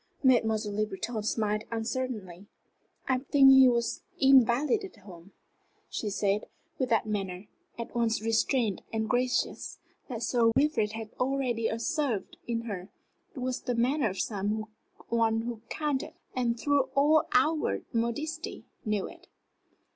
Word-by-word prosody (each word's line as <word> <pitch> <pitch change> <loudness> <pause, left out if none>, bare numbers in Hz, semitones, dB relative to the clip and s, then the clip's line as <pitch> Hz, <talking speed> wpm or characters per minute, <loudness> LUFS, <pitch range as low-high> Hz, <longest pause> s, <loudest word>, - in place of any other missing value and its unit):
Mademoiselle 220 -5 +3
Le 215 0 +1
Breton 215 +3 -4
smiled 210 0 0
uncertainly. 225 -5 -4 0.6
"I 260 -1 +2
think 270 0 +6
he 265 -1 +8
was 235 -1 0 0.2
invalided 270 - +4
home," 190 -3 -14 0.6
she 215 - -2
said, 200 0 0 0.3
with 260 -2 0
that 225 -3 +2
manner, 195 -3 -3 0.3
at 235 - -6
once 230 -2 +1
restrained 225 -1 +1
and 220 -1 -1
gracious, 250 +1 0 0.3
that 235 -2 -4
Sir 230 -1 +3
Wilfrid 275 -8 +2
had 220 -1 -6
already 250 -3 0
observed 240 - -2
in 230 -1 -1
her. 200 -4 -6 0.5
It 260 - -6
was 255 0 -2
the 245 - -2
manner 250 +1 +2
of 190 - -6
some 210 +1 -1 0.4
one 225 -1 +2
who 230 -1 -5
counted; 300 0 -2 0.2
and 240 -2 0
through 285 -1 +2
all 300 +3 +4
outward 305 +5 +2
modesty 295 +8 -3 0.2
knew 210 -3 -1
it. - - -14
235 Hz, 135 wpm, -29 LUFS, 215-260 Hz, 0.6 s, he